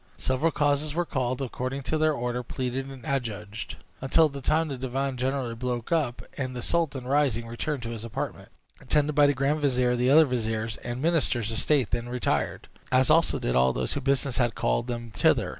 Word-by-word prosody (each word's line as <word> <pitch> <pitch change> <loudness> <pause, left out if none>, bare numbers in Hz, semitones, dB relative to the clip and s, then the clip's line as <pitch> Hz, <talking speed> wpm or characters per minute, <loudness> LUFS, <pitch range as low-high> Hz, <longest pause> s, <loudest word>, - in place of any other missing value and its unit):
Several 130 +6 +1
causes 145 0 +1
were 175 0 +1
called, 130 -3 -1
according 130 +2 -4
to 155 - 0
their 155 0 +3
order, 125 -2 -2
pleaded 130 +2 -3
and 130 -3 -10
adjudged, 110 -5 -3 0.3
until 155 +4 +4
the 140 -1 -7
time 155 +4 +1
the 140 - -3
divan 135 +1 -2
generally 130 -1 -1
broke 120 +1 -3
up, 145 -8 0 0.2
when 130 -1 -2
the 125 -1 -5
sultan, 150 -7 0
rising, 130 -4 +1
returned 120 +4 -3
to 115 - -4
his 115 -2 -6
apartment, 115 - -5 0.3
attended 150 0 +1
by 145 0 +5
the 145 - +2
grand 140 +4 +1
vizier; 125 -3 +2
the 125 +1 +2
other 155 +3 +7
viziers 115 -3 -2
and 120 +3 -5
ministers 135 -9 +1
of 115 - -1
state 140 -7 +2
then 120 +1 -2
retired, 125 0 -1 0.2
as 130 +1 +4
also 165 +1 +4
did - - -1
all 65 0 +4
those 65 0 -2
whose 145 - -2
business 135 -1 +1
had 120 -3 +1
called 120 - 0
them 120 -2 -5
thither. 90 - +2
130 Hz, 200 wpm, -27 LUFS, 120-145 Hz, 0.3 s, other